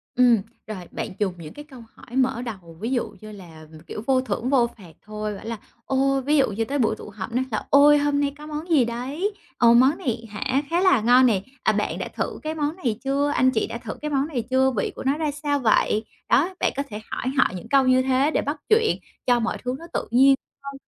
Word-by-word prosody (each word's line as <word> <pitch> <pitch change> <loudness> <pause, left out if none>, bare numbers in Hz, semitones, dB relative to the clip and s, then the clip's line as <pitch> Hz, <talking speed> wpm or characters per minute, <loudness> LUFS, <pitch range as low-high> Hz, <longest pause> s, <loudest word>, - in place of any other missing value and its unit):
Ừm. 240 -4 +5 0.3
Rồi, 195 -5 -6
bạn - - -4
dùng 200 -3 0
những 160 -3 -10
cái 295 - -10
câu 255 -4 -12
hỏi 245 - -12
mở 260 -2 +1
đầu, 190 -9 -8
ví 225 +5 -3
dụ 250 -3 0
như 215 0 -9
là, 165 -6 -12 0.2
kiểu, 210 - -6
vô 260 -1 +3
thưởng 255 -1 -3
vô 255 -4 +4
phạt 180 -6 -14
thôi, 210 0 -4
bảo - - -11
là, 230 0 -4 0.3
ô, 270 0 +1
ví 300 +2 +3
dụ 270 -6 +3
như 225 +3 -2
tới 280 +4 -2
buổi 220 -3 +2
tụ - - -10
họp 205 +1 -7
nói 255 +2 0
là 215 - -2
"Ôi! 290 +1 +7
Hôm 290 0 +1
nay 285 -1 0
có 300 0 -10
món 305 +3 -6
gì 295 -7 +4
đấy? 270 - -3 0.2
Ờ, 235 -1 +6
món 260 +6 +5
này 230 -2 -3
hả? 260 +6 -1
Khá 340 +2 +1
là 370 - +4
ngon 245 +3 +6
nè, 215 -6 +2 0.2
à, - - +4
bạn - - -1
đã - - -3
thử - - -3
cái 310 +1 -3
món 300 0 -1
này 245 - -2
chưa? 280 +1 +1
Anh 260 0 +4
chị 220 - 0
đã - - -5
thử 230 -2 -6
cái 300 0 -3
món 275 0 +1
này 260 -7 -3
chưa? 265 +1 +3
Vị - - 0
của - - -7
nó 275 +2 +1
ra 310 -2 -1
sao 290 -1 -1
vậy?" 215 -2 +2 0.2
Đó, 335 +9 +3
bạn - - +1
có 280 - 0
thể 210 -1 -6
hỏi - - -4
họ 265 - +5
những 180 - -8
câu 275 -1 +5
như 255 0 +5
thế 265 +3 +2
để - - +1
bắt 290 +2 -3
chuyện 440 0 +3 0.3
cho 245 -1 +4
mọi 230 - -1
thứ 250 0 -2
nó 335 - -10
tự - - -2
nhiên 270 +3 +6 0.3
hơn 275 0 -6
255 Hz, 255 wpm, -23 LUFS, 225-285 Hz, 0.3 s, Ôi